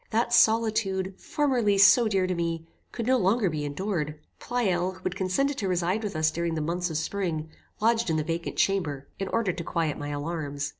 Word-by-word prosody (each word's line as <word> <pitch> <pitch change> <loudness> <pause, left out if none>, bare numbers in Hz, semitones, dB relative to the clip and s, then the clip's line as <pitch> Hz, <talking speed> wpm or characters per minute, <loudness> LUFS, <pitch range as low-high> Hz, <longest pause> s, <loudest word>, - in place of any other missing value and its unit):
That 235 +2 0
solitude, 215 -5 +3
formerly 245 -9 +1
so 200 +4 +7
dear 195 -3 +1
to 185 - -1
me, 165 -1 -2 0.3
could 230 - -4
no 260 +2 +4
longer 195 -1 +2
be 150 -1 -3
endured. 150 0 -3 0.2
Pleyel, 185 -7 0
who 185 0 -16
had 185 - -2
consented 200 +10 0
to 200 - -1
reside 180 +3 0
with 210 -5 -4
us 155 0 +2
during 170 0 -2
the - - -1
months 175 +3 -1
of 160 - -2
spring, 160 -2 -2 0.3
lodged 230 -1 +2
in 160 - +1
the 155 - 0
vacant 165 +2 -3
chamber, 150 -9 0
in 195 - -2
order 200 -3 0
to 170 - -5
quiet 160 -3 -1
my 145 0 -4
alarms. 145 -1 -3
185 Hz, 200 wpm, -27 LUFS, 160-210 Hz, 0.3 s, so